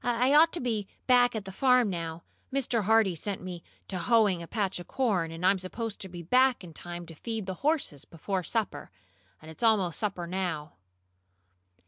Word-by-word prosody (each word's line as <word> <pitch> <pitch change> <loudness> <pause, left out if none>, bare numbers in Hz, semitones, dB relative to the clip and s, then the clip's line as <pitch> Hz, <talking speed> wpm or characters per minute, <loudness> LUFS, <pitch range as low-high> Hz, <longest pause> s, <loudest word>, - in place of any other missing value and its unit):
I 245 +3 +2
ought 320 +2 +7
to 345 - -2
be 220 -5 -2 0.2
back 245 -2 +4
at 210 -2 -4
the 195 - -7
farm 250 0 +3
now. 165 -1 -5 0.3
Mr. 250 -5 0
Hardee 220 -3 +4
set 195 +4 -4
me 180 -2 -7 0.3
to 185 - -4
hoeing 210 -3 +3
a 170 - -8
patch 195 -3 -1
of 175 - -9
corn, 200 -11 0
and 165 +2 -5
I'm 190 +1 +4
supposed 215 +4 -5
to 190 - -7
be 175 -1 -8
back 255 +5 +3
in 170 -3 -10
time 175 +1 -7
to 165 - -11
feed 220 +5 -5
the 190 - -3
horses 280 - 0
before 185 +4 -3
supper. 195 -6 -2 0.5
And 160 - -9
it's 160 - -13
almost 210 -7 +2
supper 200 -4 -2
time 170 - -7
now." 175 -5 -3
195 Hz, 195 wpm, -29 LUFS, 175-235 Hz, 0.5 s, ought